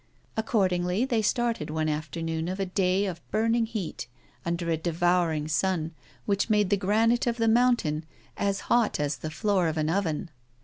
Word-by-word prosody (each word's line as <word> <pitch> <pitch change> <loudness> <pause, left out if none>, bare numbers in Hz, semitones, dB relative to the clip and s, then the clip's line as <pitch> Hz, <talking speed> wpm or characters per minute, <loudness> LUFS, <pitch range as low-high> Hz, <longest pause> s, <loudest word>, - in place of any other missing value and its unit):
Accordingly, 190 -2 +1
they 240 -4 +1
started 230 -6 0
one 155 0 -1
afternoon 160 +2 -2
of 185 +2 -3
a 195 - 0
day 185 +1 +1
of 175 -3 -4
burning 225 +1 +1
heat, 215 - -5 0.4
under 170 0 -2
a - - +3
devouring 170 -1 +1
sun, 160 +1 0 0.3
which 200 +2 0
made 210 -2 +2
the - - +6
granite 220 +5 +2
of 235 0 0
the 225 -1 +1
mountain 225 -10 +2 0.3
as 200 0 -1
hot 235 -8 +2
as 145 -1 -1
the 155 - -5
floor 190 +1 +1
of 160 0 -2
an 155 +1 +1
oven. 170 -3 -1
185 Hz, 170 wpm, -27 LUFS, 160-215 Hz, 0.4 s, the